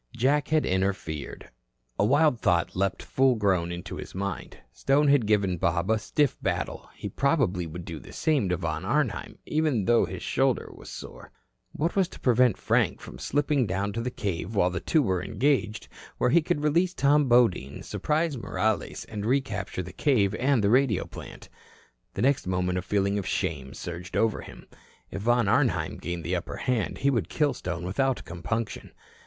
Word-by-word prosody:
Jack 140 Hz, +4 st, +2 dB
had 155 Hz, -1 st, +2 dB
interfered. 95 Hz, -6 st, -2 dB, 0.5 s
A -, -, +4 dB
wild 140 Hz, +2 st, +3 dB
thought 85 Hz, -6 st, +1 dB
leaped 95 Hz, +1 st, -1 dB
full 130 Hz, -1 st, +3 dB
grown 95 Hz, -5 st, +1 dB
into 85 Hz, 0 st, -6 dB
his -, -, -8 dB
mind. 100 Hz, -1 st, -4 dB
Stone 140 Hz, +2 st, +2 dB
had 140 Hz, -6 st, +4 dB
given 100 Hz, -4 st, +2 dB
Bob 85 Hz, +5 st, +1 dB
a 110 Hz, -, +2 dB
stiff 145 Hz, +5 st, +1 dB
battle; -, -, -3 dB
he -, -, -6 dB
probably 120 Hz, -, +1 dB
would 85 Hz, +2 st, -8 dB
do 80 Hz, -3 st, -6 dB
the -, -, -13 dB
same 145 Hz, -, +1 dB
to 90 Hz, -, +1 dB
Von -, -, -3 dB
Arnheim, -, -, -1 dB
even 150 Hz, -9 st, +1 dB
though 120 Hz, -2 st, +4 dB
his 90 Hz, +1 st, -7 dB
shoulder 130 Hz, -1 st, 0 dB
was -, -, -12 dB
sore. -, -, -9 dB, 0.4 s
What 165 Hz, +4 st, -1 dB
was 190 Hz, -3 st, +3 dB
to -, -, -13 dB
prevent 125 Hz, -3 st, +3 dB
Frank -, -, +1 dB
from -, -, -11 dB
slipping 145 Hz, -3 st, +1 dB
down 100 Hz, +2 st, -2 dB
to 115 Hz, -, -2 dB
the 125 Hz, -, -2 dB
cave 100 Hz, -3 st, -4 dB
while 90 Hz, -2 st, +3 dB
the 90 Hz, -, -2 dB
two 155 Hz, -, +2 dB
were 95 Hz, -6 st, 0 dB
engaged, 120 Hz, -3 st, 0 dB, 0.3 s
where -, -, +2 dB
he 170 Hz, -, +5 dB
could 155 Hz, -1 st, -1 dB
release 170 Hz, +5 st, +2 dB
Tom 145 Hz, -1 st, +3 dB
Bodine, 100 Hz, -, +2 dB
surprise 155 Hz, 0 st, -1 dB
Morales 95 Hz, -2 st, -2 dB
and 105 Hz, -2 st, -6 dB
recapture 110 Hz, -7 st, -1 dB
the 90 Hz, +1 st, -10 dB
cave 110 Hz, -9 st, +2 dB
and 130 Hz, -3 st, +2 dB
the 100 Hz, -, +3 dB
radio 125 Hz, -5 st, +3 dB
plant? -, -, -10 dB, 0.7 s
The -, -, -1 dB
next 135 Hz, -6 st, +2 dB
moment 90 Hz, 0 st, 0 dB
a -, -, -3 dB
feeling 100 Hz, +1 st, 0 dB
of 95 Hz, -, -5 dB
shame 70 Hz, -7 st, -2 dB
surged 85 Hz, +2 st, -6 dB
over 110 Hz, -1 st, +1 dB
him. -, -, -12 dB, 0.5 s
If 100 Hz, -, -5 dB
Von 120 Hz, 0 st, +2 dB
Arnheim -, -, +1 dB
gained 85 Hz, +1 st, -5 dB
the 90 Hz, +3 st, -1 dB
upper 85 Hz, 0 st, -4 dB
hand, 125 Hz, -6 st, -1 dB
he 140 Hz, +1 st, +2 dB
would 110 Hz, -10 st, -1 dB
kill 150 Hz, -3 st, +1 dB
Stone 85 Hz, -7 st, -5 dB
without 130 Hz, +8 st, 0 dB
compunction. 105 Hz, +6 st, -4 dB
110 Hz, 180 wpm, -27 LUFS, 90-135 Hz, 0.7 s, he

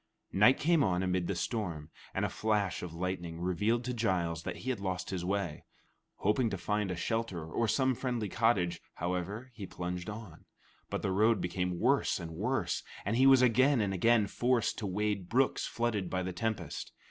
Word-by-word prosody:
Night 105 Hz, +7 st, +6 dB
came 160 Hz, -1 st, +3 dB
on 90 Hz, -3 st, +1 dB
amid 90 Hz, -1 st, 0 dB
the 100 Hz, -, -1 dB
storm, 85 Hz, -5 st, -3 dB, 0.2 s
and -, -, +1 dB
a -, -, -1 dB
flash 105 Hz, -4 st, 0 dB
of 90 Hz, -, -5 dB
lightning 85 Hz, -2 st, -3 dB
revealed 105 Hz, +7 st, +1 dB
to 125 Hz, +1 st, -2 dB
Giles 90 Hz, -8 st, 0 dB
that -, -, -4 dB
he 130 Hz, -, -3 dB
had 120 Hz, -, -3 dB
lost 95 Hz, -2 st, -3 dB
his 90 Hz, -2 st, -2 dB
way. 95 Hz, -4 st, -2 dB, 0.5 s
Hoping 110 Hz, +4 st, +1 dB
to 100 Hz, -, -3 dB
find 105 Hz, +2 st, -1 dB
a 90 Hz, -, -2 dB
shelter 95 Hz, -2 st, -2 dB
or 115 Hz, +8 st, -1 dB
some 130 Hz, +3 st, +2 dB
friendly 120 Hz, -3 st, -2 dB
cottage, 95 Hz, -7 st, +1 dB
however, 90 Hz, +8 st, -3 dB
he 100 Hz, -4 st, -7 dB
plunged 90 Hz, +1 st, -4 dB
on; 105 Hz, -6 st, -9 dB, 0.4 s
but -, -, -3 dB
the 95 Hz, -, 0 dB
road 110 Hz, +3 st, +3 dB
became 90 Hz, 0 st, -2 dB
worse 135 Hz, -5 st, +2 dB
and 85 Hz, -2 st, -6 dB
worse, 110 Hz, +11 st, -1 dB, 0.2 s
and 100 Hz, +3 st, 0 dB
he 130 Hz, +3 st, +5 dB
was 135 Hz, -1 st, +7 dB
again 130 Hz, +3 st, +4 dB
and 100 Hz, -3 st, 0 dB
again 110 Hz, +3 st, +4 dB
forced 120 Hz, +4 st, +1 dB
to 105 Hz, -, -3 dB
wade 100 Hz, -1 st, -1 dB
brooks 130 Hz, +3 st, +2 dB
flooded 110 Hz, -6 st, -1 dB
by 95 Hz, 0 st, -1 dB
the 90 Hz, 0 st, -3 dB
tempest. 110 Hz, +5 st, -3 dB
100 Hz, 190 wpm, -32 LUFS, 90-115 Hz, 0.5 s, was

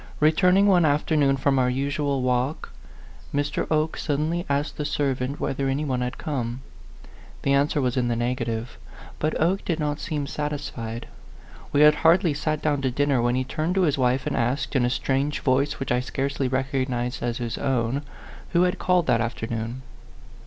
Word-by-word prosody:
Returning 180 Hz, +6 st, +4 dB
one 185 Hz, -4 st, +5 dB
afternoon 145 Hz, -2 st, +2 dB
from 135 Hz, 0 st, +2 dB
our 125 Hz, -1 st, +3 dB
usual 140 Hz, +1 st, -1 dB
walk, 125 Hz, +4 st, -1 dB, 0.6 s
Mr. 145 Hz, 0 st, -1 dB
Oke 155 Hz, 0 st, +1 dB
suddenly 160 Hz, +4 st, -1 dB
asked 140 Hz, +2 st, -1 dB
the 150 Hz, -, -2 dB
servant 140 Hz, -2 st, -1 dB
whether 135 Hz, 0 st, -1 dB
any 140 Hz, +3 st, -1 dB
one 130 Hz, -3 st, -1 dB
had 125 Hz, +1 st, -3 dB
come. 130 Hz, -5 st, -3 dB, 0.8 s
The 140 Hz, -, +2 dB
answer 145 Hz, +2 st, +2 dB
was 125 Hz, -3 st, 0 dB
in 125 Hz, -1 st, +1 dB
the 120 Hz, -, 0 dB
negative; 120 Hz, -, -2 dB, 0.4 s
but 155 Hz, +1 st, -1 dB
Oke 180 Hz, +5 st, +1 dB
did 165 Hz, -2 st, -1 dB
not 150 Hz, -1 st, -1 dB
seem 150 Hz, -2 st, -3 dB
satisfied. 140 Hz, -6 st, -4 dB, 0.6 s
We 145 Hz, -, +3 dB
had 150 Hz, 0 st, +8 dB
hardly 165 Hz, 0 st, +4 dB
sat 155 Hz, +1 st, -2 dB
down 145 Hz, -2 st, +1 dB
to 130 Hz, -, +1 dB
dinner 140 Hz, 0 st, +1 dB
when 120 Hz, +1 st, +1 dB
he 130 Hz, -, +1 dB
turned 155 Hz, +7 st, -2 dB
to 190 Hz, -, +3 dB
his 150 Hz, -5 st, +2 dB
wife 130 Hz, +1 st, +1 dB
and -, -, -1 dB
asked, 125 Hz, +6 st, -1 dB
in 125 Hz, -2 st, +3 dB
a -, -, +2 dB
strange 135 Hz, +3 st, -1 dB
voice 140 Hz, +2 st, +1 dB
which 135 Hz, -, -3 dB
I 125 Hz, -, +3 dB
scarcely 135 Hz, +1 st, -2 dB
recognized 130 Hz, -2 st, -1 dB
as 120 Hz, -1 st, -1 dB
his 120 Hz, -2 st, -4 dB
own, 130 Hz, 0 st, 0 dB, 0.5 s
who 175 Hz, +1 st, +4 dB
had 180 Hz, 0 st, 0 dB
called 180 Hz, -2 st, +2 dB
that 115 Hz, -7 st, +2 dB
afternoon. 115 Hz, +1 st, -4 dB
140 Hz, 180 wpm, -25 LUFS, 125-150 Hz, 0.8 s, had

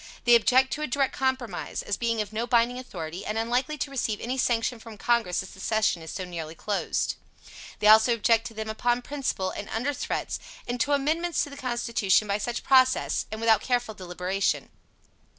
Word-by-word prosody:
They 240 Hz, -, +5 dB
object 255 Hz, +3 st, +5 dB
to 305 Hz, -, -4 dB
a 305 Hz, -, -1 dB
Direct 275 Hz, +1 st, 0 dB
compromise, 260 Hz, -7 st, -2 dB
as 205 Hz, -, -1 dB
being 230 Hz, -2 st, 0 dB
of 210 Hz, 0 st, -6 dB
no 230 Hz, +2 st, -2 dB
binding 240 Hz, +1 st, +2 dB
authority, 175 Hz, -7 st, -7 dB
and 215 Hz, +1 st, -3 dB
unlikely 245 Hz, +6 st, 0 dB
to 285 Hz, -, -3 dB
receive 230 Hz, -6 st, -1 dB
any 250 Hz, +2 st, -3 dB
sanction 240 Hz, -2 st, 0 dB
from 225 Hz, -1 st, -11 dB
Congress 225 Hz, -5 st, +1 dB
as 190 Hz, -, -11 dB
the -, -, -14 dB
session 215 Hz, -4 st, +1 dB
is 160 Hz, -, -9 dB
so 185 Hz, -, -4 dB
nearly 165 Hz, -3 st, -6 dB
closed. 205 Hz, +3 st, -1 dB, 0.6 s
They -, -, -3 dB
also 220 Hz, +3 st, +7 dB
object 230 Hz, +1 st, +2 dB
to 225 Hz, -, -12 dB
them 220 Hz, 0 st, -4 dB
upon 240 Hz, +3 st, 0 dB
principle, 265 Hz, -10 st, -2 dB
and 205 Hz, -, -7 dB
under 250 Hz, +6 st, -1 dB
threats, -, -, -3 dB, 0.3 s
and 245 Hz, +1 st, -3 dB
to 285 Hz, +4 st, +1 dB
amendments 320 Hz, +4 st, +1 dB
to 290 Hz, -, -7 dB
the -, -, -8 dB
Constitution 235 Hz, -6 st, +1 dB
by 200 Hz, +1 st, 0 dB
such 235 Hz, +3 st, -3 dB
process, 260 Hz, -1 st, +3 dB
and 220 Hz, -, -5 dB
without 225 Hz, -2 st, +4 dB
careful 245 Hz, -3 st, -1 dB
deliberation. 185 Hz, +1 st, -2 dB
230 Hz, 195 wpm, -27 LUFS, 210-255 Hz, 0.6 s, also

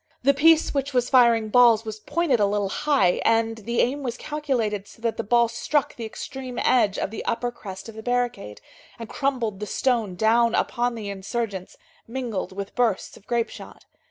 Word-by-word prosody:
The 280 Hz, +2 st, +5 dB
piece 320 Hz, +3 st, +4 dB
which 275 Hz, -1 st, -2 dB
was 245 Hz, 0 st, +1 dB
firing 235 Hz, -4 st, +5 dB
balls 230 Hz, -1 st, +5 dB
was 215 Hz, -1 st, -6 dB
pointed 290 Hz, 0 st, 0 dB
a 205 Hz, -, +3 dB
little 200 Hz, -1 st, -1 dB
high, 275 Hz, -6 st, +2 dB
and 225 Hz, 0 st, +2 dB
the 235 Hz, +3 st, 0 dB
aim 275 Hz, +4 st, 0 dB
was 245 Hz, -3 st, -4 dB
calculated 245 Hz, -11 st, -2 dB
so -, -, -16 dB
that 230 Hz, -1 st, 0 dB
the 230 Hz, -, -3 dB
ball 235 Hz, +2 st, +3 dB
struck 270 Hz, +5 st, -1 dB
the 230 Hz, -, -6 dB
extreme 255 Hz, +3 st, -7 dB
edge 215 Hz, -6 st, +2 dB
of -, -, -2 dB
the 225 Hz, -, -6 dB
upper 240 Hz, +1 st, -1 dB
crest 195 Hz, -5 st, -9 dB
of 225 Hz, -, -9 dB
the 220 Hz, -, -8 dB
barricade, 245 Hz, -, -2 dB, 0.4 s
and 230 Hz, -, -7 dB
crumbled 240 Hz, -7 st, -2 dB
the 210 Hz, -, -5 dB
stone 230 Hz, -8 st, 0 dB
down 230 Hz, +3 st, +3 dB
upon 240 Hz, 0 st, 0 dB
the 210 Hz, -3 st, -5 dB
insurgents, 200 Hz, -1 st, -4 dB, 0.3 s
mingled 235 Hz, -6 st, -4 dB
with 200 Hz, +1 st, -6 dB
bursts 235 Hz, -6 st, 0 dB
of 200 Hz, -, -18 dB
grape 235 Hz, -1 st, 0 dB
shot. -, -, -12 dB
235 Hz, 190 wpm, -24 LUFS, 210-250 Hz, 0.4 s, The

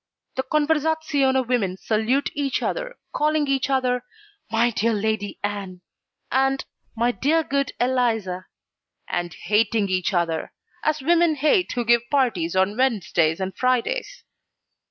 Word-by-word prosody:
The 265 Hz, -, -1 dB
conversazione 295 Hz, -2 st, +1 dB
women 205 Hz, -7 st, 0 dB
salute 225 Hz, +7 st, 0 dB
each 280 Hz, -2 st, -1 dB
other -, -, -3 dB, 0.2 s
calling 305 Hz, 0 st, +1 dB
each 270 Hz, -1 st, 0 dB
other 250 Hz, -2 st, +1 dB, 0.5 s
'My 230 Hz, +2 st, +3 dB
dear 230 Hz, +1 st, +1 dB
Lady 210 Hz, -1 st, -1 dB
Ann' 200 Hz, -3 st, -4 dB, 0.5 s
and 270 Hz, +1 st, +1 dB, 0.3 s
'My 235 Hz, +2 st, +2 dB
dear 315 Hz, +6 st, +1 dB
good 275 Hz, -1 st, -1 dB
Eliza,' 225 Hz, -8 st, 0 dB, 0.6 s
and 175 Hz, -1 st, -2 dB
hating 210 Hz, +1 st, +2 dB
each 185 Hz, 0 st, 0 dB
other, 170 Hz, -3 st, -1 dB, 0.3 s
as 310 Hz, -2 st, 0 dB
women 340 Hz, +1 st, +4 dB
hate 310 Hz, +6 st, +2 dB
who 240 Hz, -1 st, -1 dB
give 235 Hz, +1 st, +5 dB
parties 220 Hz, -, +1 dB
on 190 Hz, +2 st, +2 dB
Wednesdays 195 Hz, -10 st, +1 dB
and 190 Hz, -1 st, -3 dB
Fridays. 255 Hz, -, -1 dB
245 Hz, 130 wpm, -23 LUFS, 205-280 Hz, 0.6 s, give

